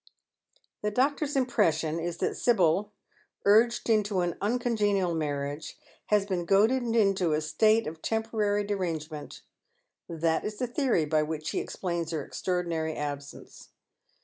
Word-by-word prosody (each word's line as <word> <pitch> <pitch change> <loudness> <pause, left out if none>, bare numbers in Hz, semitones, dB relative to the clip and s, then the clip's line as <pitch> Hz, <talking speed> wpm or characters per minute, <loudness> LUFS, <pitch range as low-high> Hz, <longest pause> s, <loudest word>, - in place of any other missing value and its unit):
The 210 - 0
doctor's 280 +6 0
impression 170 - +1
is 170 +1 -3
that - - -1
Sibyl, 200 -3 +2 0.5
urged 225 +4 +4
into 210 -4 +2
an 175 -1 0
uncon 240 +3 0
genial 200 -4 +1
marriage, 145 -1 -3 0.3
has 210 -2 +3
been 185 -3 -2
goaded 215 +8 +4
into 195 -6 +3
a 150 - +2
state 215 +9 +3
of 160 +1 -7
temporary 220 -2 0
derangement. 165 -7 -4 0.7
That 165 -1 0
is 210 0 -4
the 250 - -1
theory 245 - +1
by 155 +1 +2
which 155 0 -3
he - - -1
explains 170 -3 -3
her 155 -4 -3
extraordinary 170 -3 -2
absence. 145 -1 -7
185 Hz, 135 wpm, -28 LUFS, 160-215 Hz, 0.7 s, urged